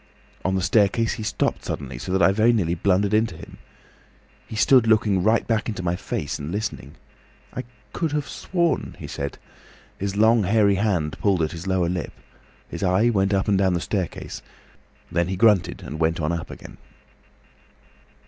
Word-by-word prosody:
"On 95 0 0
the 95 - 0
staircase 105 +3 +2
he 115 - -6
stopped 105 - -1
suddenly, 65 -4 -5
so 90 - -5
that 95 +1 +2
I - - +6
very 110 +4 +4
nearly 90 -8 +1
blundered 100 +3 +1
into 110 -5 +1
him. - - -12 0.9
He - - -7
stood 120 +2 +5
looking 105 -4 +3
back 110 +3 +3
right 115 0 0
into 100 -4 -4
my 85 0 0
face 75 -4 -4
and 75 +3 -5
listening. 90 -9 -4 0.6
'I 130 - -5 0.3
could 165 -3 -1
have 150 -2 -1
sworn,' 170 -6 -1
he - - -8
said. 70 -1 -5 0.6
His 100 +1 -3
long 110 +2 +5
hairy 100 0 +4
hand 90 -8 0
pulled 95 -5 +2
at 80 - -1
his 85 +2 -7
lower 95 -2 +1
lip. 90 0 -3 0.5
His - - -7
eye 95 +5 +3
went 95 -2 +1
up 95 -1 +1
and 100 -2 +3
down 95 -2 +2
the - - 0
staircase. 95 0 -4 0.7
Then 85 0 +1
he 95 - -2
grunted 95 -4 +3
and 75 +3 -7
went 80 0 +1
on 75 +1 0
up 85 -1 -4
again. - - -11
95 Hz, 180 wpm, -23 LUFS, 85-110 Hz, 0.9 s, I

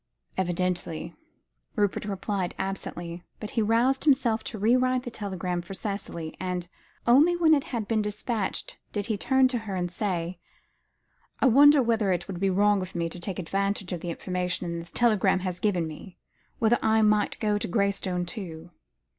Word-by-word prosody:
"Evidently," 175 -2 -2 0.6
Rupert 205 -2 0
replied 195 -2 -2
absently, 175 -3 -5 0.2
but 215 - -6
he 230 - +1
roused 235 +5 +2
himself 240 -6 +3
to 220 - -5
re 220 +5 +3
write 255 0 +2
the 245 - -6
telegram 185 -5 -3
for 175 +3 -8
Cicely; 195 -6 -5
and, 180 -1 -3 0.4
only 290 +9 +6
when 330 -2 +5
it 285 -3 +2
had 230 -5 -3
been 220 -1 +1
despatched, 210 0 -3
did 205 -2 -2
he 220 -1 -1
turn 265 +5 +3
to 250 -2 -1
her 210 -4 -5
and 175 -1 -2
say 180 -3 -2 1.0
"I - - +2
wonder 280 +2 +7
whether 225 -4 +1
it 175 -1 -1
would 185 -3 -5
be 195 0 +2
wrong 205 +1 +3
of 185 0 -7
me 170 -1 -1
to 175 - -8
take 185 +1 -4
advantage 195 +1 -1
of 175 - -3
the 175 - -5
information 180 0 -2
this 170 0 -10
telegram 210 -5 +3
has 180 -1 -2
given 185 -6 +1
me; 175 +4 -10 0.4
whether 230 +1 +3
I 220 0 +3
might 210 -1 +2
go 210 -1 +1
to - - -3
Graystone, 190 -2 0
too?" 175 -4 -7
200 Hz, 175 wpm, -27 LUFS, 180-225 Hz, 1.0 s, wonder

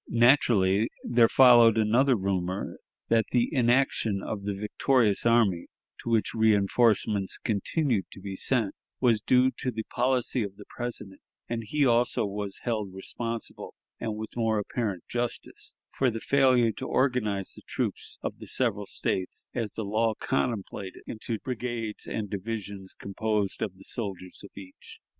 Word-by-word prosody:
Naturally 115 -4 +4
there 120 -1 +4
followed 120 -4 +7
another 120 +5 +4
rumor, 95 -2 -2 0.3
that 115 -1 +3
the 120 -1 +2
inaction 120 -5 +2
of 100 -2 -4
the 100 -1 -2
victorious 105 +2 +1
army, 110 -7 +3 0.3
to - - -6
which 115 -2 +2
reënforcements 105 -1 +2
continued 115 - 0
to - - -12
be 95 0 -6
sent, 115 -1 +1 0.3
was 115 -4 +3
due 130 +3 +4
to 130 - -1
the 110 -2 -4
policy 125 +1 0
of 100 -2 -4
the 105 0 -12
President; 115 -5 -6 0.3
and 115 -1 -3
he 145 +5 +2
also 120 -1 +2
was 100 -1 -5
held 110 -5 -2
responsible, 115 +4 -5 0.2
and 110 -2 -3
with 110 0 -7
more 115 -2 +1
apparent 105 -3 -2
justice, 120 0 -5 0.2
for 130 - +1
the 115 -1 -4
failure 130 -3 +3
to 130 +4 -6
organize 105 -7 0
the - - -9
troops - - -3
of - - -4
the - - -9
several 105 -6 -1
States, 95 -1 -3
as 115 -4 -3
the 110 - -4
law 110 +2 +1
contemplated, 95 - -3
into 115 0 -4
brigades 120 -3 -4
and 105 -2 -3
divisions 100 -1 -6
composed 105 0 -2
of 95 -3 -2
the 95 - -14
soldiers 95 -6 -5
of 100 - -10
each. 95 -1 -12
110 Hz, 150 wpm, -27 LUFS, 100-120 Hz, 0.3 s, followed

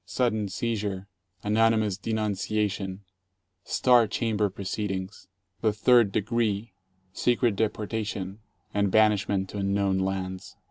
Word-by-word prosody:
Sudden 110 0 0
seizure, 100 -2 -3 0.4
anonymous 110 -1 +2
denunciation, 105 -2 -2 0.6
star 120 -3 +4
chamber 105 -1 0
proceedings, 95 +1 -4 0.3
the 110 - +3
third 110 0 +4
de - - +1
gree, 110 -1 -1 0.4
secret 120 0 +2
deportation 105 -2 -2 0.3
and 100 -1 +2
banishment 105 -2 +3
to 105 - -5
unknown 100 -1 +1
lands. 95 -1 -3
105 Hz, 100 wpm, -27 LUFS, 95-110 Hz, 0.6 s, star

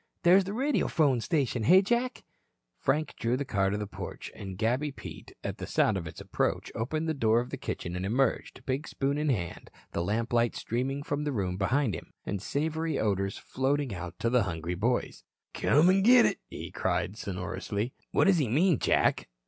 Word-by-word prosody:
"There's 185 +2 +6
the 195 - -4
radiophone 165 - +2
station, 135 -5 0
hey, 185 - +6
Jack?" 240 +4 0 0.6
Frank 155 +2 0
drew 120 +2 +1
the 140 - -2
car 95 -5 +1
to 100 - -1
the 105 - -3
porch, 100 - -7
and 95 -2 -7
Gabby 125 +8 0
Pete, - - -10
at - - -4
the - - -5
sound 110 - +2
of 85 -4 -3
its - - -9
approach, - - -1
opened 155 +8 -2
the 160 - +1
door 115 -5 +3
of 125 - -4
the - - -4
kitchen 85 - -4
and 90 - -3
emerged, 125 +7 0
big 135 +3 -2
spoon 140 +2 -1
in 150 0 0
hand, 90 -10 -2 0.2
the 85 - -1
lamplight 115 +4 +1
streaming 135 +4 -2
from 145 0 -2
the 150 - -1
room 95 -7 -1
behind 115 +5 +1
him, - - -8
and 100 -2 -3
savory 160 +6 -1
odors 100 -1 0
floating 135 -1 -1
out 90 -1 -6
to 115 - 0
the 125 -1 +4
hungry 85 -3 -3
boys. 115 +8 -1 0.3
"Come 150 +5 +4
an' 195 +1 +3
git 245 +4 +7
it," - - 0
he - - -7
called 100 - -1
sonorously. 100 +4 -4 0.2
"What - - +3
does 195 -3 +4
he 140 - +1
mean 155 - +3
Jack?" - - +2
125 Hz, 195 wpm, -29 LUFS, 100-150 Hz, 0.6 s, git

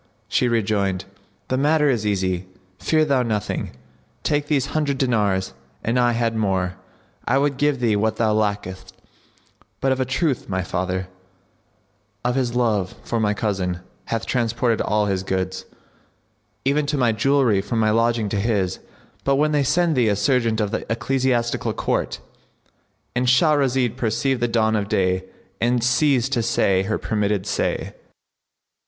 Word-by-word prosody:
She 125 - +1
rejoined, 100 -5 0 0.4
"The 130 - +1
matter 150 +1 +3
is 115 -6 +1
easy; 95 -2 -1 0.3
fear 155 -1 +2
thou 140 -3 +2
nothing. 110 -4 -2 0.5
Take 145 -1 0
these 140 -4 +1
hundred 145 -3 0
dinars: 105 - +1 0.3
an 120 +3 +1
I 120 -1 +3
had 115 -1 0
more, 95 -4 0 0.5
I 130 - +2
would 140 0 +1
give 145 -2 +1
thee 115 -4 +2
what 110 +2 +1
thou 110 -2 +1
lackest; 95 -3 -2 0.8
but 135 - +1
of 130 - 0
a 130 - +1
truth 135 0 -1
my 95 -1 -1
father, 90 +1 -2 1.2
of 125 - +2
his 125 -2 -1
love 105 -7 +1
for 115 - -2
my 105 -1 +1
cousin, 95 -5 -2 0.2
hath 115 -1 -2
transported 120 -1 0
all 105 0 +1
his 95 -2 0
goods, 95 0 -3 1.0
even 145 +2 +2
to 145 0 0
my 125 -3 +3
jewellery 115 -2 +2
from 105 +4 -3
my 110 -1 +3
lodging 115 0 +2
to 100 - -1
his. 100 -4 0 0.4
But 140 - +2
when 150 +2 +2
they 150 -1 +2
send 160 +4 +2
thee 120 -4 +3
a 100 - +2
serjeant 115 0 +1
of 105 -2 0
the - - -2
Ecclesiastical 120 0 0
Court,"—And 125 +1 -5
Shahrazad 130 -3 +3
perceived 120 +2 0
the 120 - +2
dawn 110 -1 +2
of 105 -1 -1
day 95 -3 +1 0.4
and 120 0 +2
ceased 130 +1 +2
to 120 - +2
say 100 -4 +2
her 105 +3 -1
permitted 105 -2 -1
say. - - -2
115 Hz, 155 wpm, -22 LUFS, 100-130 Hz, 1.2 s, matter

